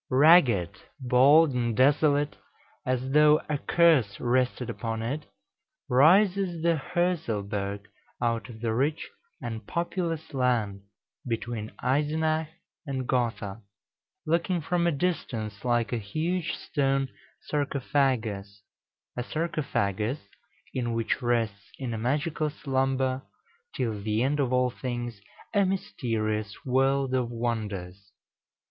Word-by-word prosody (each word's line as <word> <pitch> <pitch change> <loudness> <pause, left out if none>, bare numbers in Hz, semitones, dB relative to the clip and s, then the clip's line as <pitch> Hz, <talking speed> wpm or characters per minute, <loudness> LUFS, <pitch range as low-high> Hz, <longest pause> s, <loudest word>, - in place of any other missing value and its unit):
Ragged, 130 - +5 0.2
bald, 135 +5 +5
and 120 -3 -1
desolate, 145 +2 +3 0.5
as 130 +1 -1
though 150 +1 +6
a 150 -2 -1
curse 155 -14 +3
rested 125 0 +1
upon 115 -1 -3
it, 145 +6 -3 0.6
rises 175 +5 +4
the 170 0 +4 0.2
Hörselberg 105 - -1 0.4
out 115 0 -1
of 110 -2 -11
the 115 -2 0
rich 140 +7 0 0.4
and 115 -3 -5
populous 170 -2 -2
land 120 -7 0 0.5
between 115 -1 -3
Eisenach 155 +4 +1 0.4
and 130 -2 -3
Gotha, 115 -4 -1 0.6
looking, 170 +3 +1
from 170 +2 0
a - - +3
distance, 120 - -2
like 120 -1 +1
a 120 - 0
huge 160 - -2
stone 135 -2 0 0.3
sarcophagus 125 -8 -1 0.5
a 125 - -2
sarcophagus 130 - -1 0.6
in 120 -2 -1
which 115 +3 -1
rests 115 -4 -1
in 130 -3 -4
magical 150 +5 0
slumber, 135 -2 0 0.5
till 110 -4 -2
the 110 +2 0
end 145 +3 +1
of 130 -3 +1
all 125 0 +2
things, 120 -4 -5 0.3
a 205 -2 +4
mysterious 110 - -2
world 135 +1 +2
of 125 -2 +1
wonders. 100 -5 -4
130 Hz, 110 wpm, -27 LUFS, 115-150 Hz, 0.6 s, though